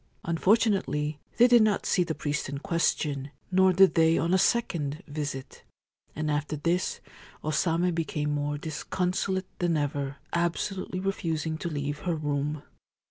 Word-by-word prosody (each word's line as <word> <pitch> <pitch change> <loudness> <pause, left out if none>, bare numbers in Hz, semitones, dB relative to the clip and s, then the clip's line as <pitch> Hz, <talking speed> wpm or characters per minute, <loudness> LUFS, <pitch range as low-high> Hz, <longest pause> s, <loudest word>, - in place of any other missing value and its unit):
Unfortunately, 170 -5 +1 0.2
they 240 - +7
did 240 -2 +6
not 215 -2 +2
see 180 - +3
the 165 -2 -3
priest 145 -2 -2
in 140 - -4
question; 145 -3 0 0.2
nor 190 0 +5
did 190 +1 +6
they 165 0 +4
on 170 +2 +1
a - - +6
second 170 -9 0
visit; 145 -3 -5 0.5
and 155 0 -1
after 150 +1 -1
this 170 +5 -1 0.4
O 155 - -1
Same 170 +3 +1
became 155 -2 -1
more 145 0 -1
disconsolate 180 +5 -2
than 175 -2 +1
ever, 140 -1 -2 0.2
absolutely 180 +2 -1
refusing 165 -5 -2
to 170 - -3
leave 145 -1 -3
her 175 -2 -1
room. 145 -1 -2
160 Hz, 145 wpm, -28 LUFS, 145-180 Hz, 0.5 s, they